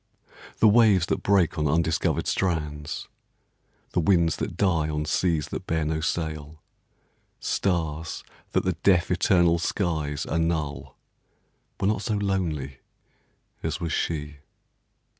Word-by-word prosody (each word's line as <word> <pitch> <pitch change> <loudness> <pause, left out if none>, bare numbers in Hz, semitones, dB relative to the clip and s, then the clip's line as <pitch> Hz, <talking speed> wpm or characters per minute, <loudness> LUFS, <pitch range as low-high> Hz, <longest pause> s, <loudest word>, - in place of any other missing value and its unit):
The 110 - +5
waves 105 -5 +5
that - - -1
break 90 -4 +2
on 75 - +1
undiscovered 80 +2 +1
strands, 75 -4 -2 0.8
The - - +1
winds 85 -2 +3
that 85 - -4
die 85 -6 +2
on 75 0 -2
seas 80 -1 0
that - - -6
bear 80 -1 0
no 80 +1 -1
sail, 80 -2 -3 0.8
Stars 80 -4 -2 0.3
that - - +1
the - - +2
deaf, 90 -3 +2
eternal 85 -2 +3
skies 80 -5 -1
annul, 80 -3 -2 0.8
Were 95 - 0
not 105 0 +1
so 110 -1 -1
lonely 85 -10 -2 0.8
as 80 +1 -2
was 85 -3 -3
she. 75 -2 -2
80 Hz, 120 wpm, -26 LUFS, 75-90 Hz, 0.8 s, The